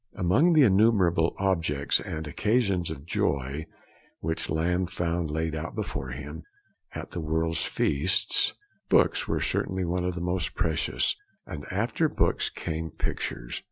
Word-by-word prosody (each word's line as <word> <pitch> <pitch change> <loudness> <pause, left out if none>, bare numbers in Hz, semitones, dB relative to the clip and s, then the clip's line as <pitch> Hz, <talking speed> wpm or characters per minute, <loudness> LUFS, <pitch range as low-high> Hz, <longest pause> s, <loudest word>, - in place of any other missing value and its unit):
Among 120 - +4
the 155 -3 +7
innumerable 95 -6 +4
objects 85 -7 +1
and 80 0 -5
occasions 100 - +1
of 75 -2 -7
joy 70 -1 -1 0.5
which 80 0 -2
Lamb 90 +4 +1
found 85 -2 -1
laid 80 +1 -1
out 80 - -4
before 65 - -4
him, 75 +5 -7 0.5
at - - -6
the - - -4
world's 80 +1 0
feast, 70 - +2 0.3
books - - +4
were - - 0
certainly 95 -1 -1
one 90 +1 -1
of 90 0 -1
the - - -3
most 90 -2 -1
precious, 75 -6 +1 0.3
and 70 - -7
after 115 - +1
books - - +1
came 80 -1 -4
pictures. - - -4
85 Hz, 140 wpm, -27 LUFS, 80-95 Hz, 0.5 s, the